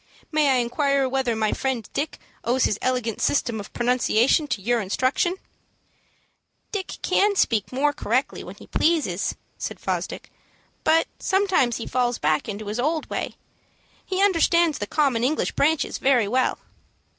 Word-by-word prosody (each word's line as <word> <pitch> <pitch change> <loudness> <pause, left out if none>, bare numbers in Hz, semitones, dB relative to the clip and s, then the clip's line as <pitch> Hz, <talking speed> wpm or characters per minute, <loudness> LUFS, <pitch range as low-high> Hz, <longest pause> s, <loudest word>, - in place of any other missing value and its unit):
"May 305 -2 +3
I 265 - +4
inquire 270 +3 +1
whether 260 -3 0
my 220 -1 0
friend 255 -6 -2
Dick 300 - -2 0.3
owes 250 +2 +1
his 210 - +1
elegant 250 -4 -1
system 235 -6 +1
of 200 - -8
pronunciation 245 +3 +2
to 245 -6 -2
your 235 +4 +1
instructions?" 255 - 0 1.3
"Dick 395 -3 -4
can 405 0 +3
speak 225 - +1
more 285 +3 +1
correctly 255 -2 -1
when - - -9
he - - -14
pleases," 295 - 0 0.2
said - - -5
Fosdick; - - -4 0.5
"but 325 +1 +4
sometimes 380 - +2
he 230 - -5
falls 245 -1 0
back 155 +6 0
into 210 +1 -5
his 210 +3 -4
old 310 +4 0
way. - - -3 0.7
He 380 +1 0
understands 340 -4 +3
the 205 - -3
common 270 -5 +1
English 290 +5 +1
branches 315 +1 +1
very 250 -6 +3
well." 255 +4 +1
255 Hz, 150 wpm, -24 LUFS, 230-310 Hz, 1.3 s, I